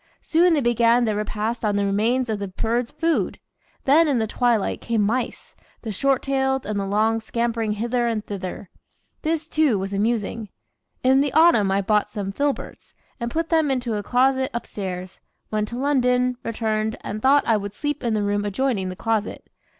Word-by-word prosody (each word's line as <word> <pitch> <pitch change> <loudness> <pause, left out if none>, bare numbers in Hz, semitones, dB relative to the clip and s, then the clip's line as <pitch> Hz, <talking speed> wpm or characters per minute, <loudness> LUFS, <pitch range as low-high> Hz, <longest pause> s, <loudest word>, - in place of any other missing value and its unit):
Soon 340 +1 +3
they 295 - +1
began 240 0 +3
their 215 -2 0
repast 215 +2 -3
on 210 -2 +1
the 200 0 +1
remains 225 +6 +1
of 215 -2 -2
the 200 - -3
birds' 230 +5 -1
food. 325 +2 -1 0.5
Then 305 +4 +5
in 280 -4 +2
the 220 - +1
twilight 235 -1 0
came 230 -3 0
mice, 235 +4 -2 0.3
the 225 - -4
short 270 +5 +1
tailed 265 -1 0
and 205 -1 -2
the 195 - -2
long, 220 +3 +2
scampering 230 -1 -1
hither 235 +3 -1
and 220 -2 -2
thither. 190 -1 -6 0.5
This, 320 0 -1
too, 310 -9 +2
was 195 +1 -4
amusing. 215 0 -1 0.5
In 265 +1 +5
the 285 -1 0
autumn 310 - +5
I 195 +1 +1
bought 210 +1 +1
some 200 -2 -4
filberts, 285 +6 -3 0.2
and 235 -1 -2
put 325 +5 -2
them 320 -3 +3
into 250 -3 -1
a 210 - -1
closet 260 +4 +2
upstairs, 185 -5 -5 0.3
went 215 0 0
to 235 - -6
London, 250 -2 +2
returned, 220 -1 -1
and 215 +1 -5
thought 280 +3 +5
I 225 - +3
would 205 0 -6
sleep 295 0 -3
in 230 -2 0
the 210 - 0
room 205 0 0
adjoining 205 -2 -1
the 185 - -6
closet. 220 +1 -2
230 Hz, 185 wpm, -23 LUFS, 210-265 Hz, 0.5 s, Then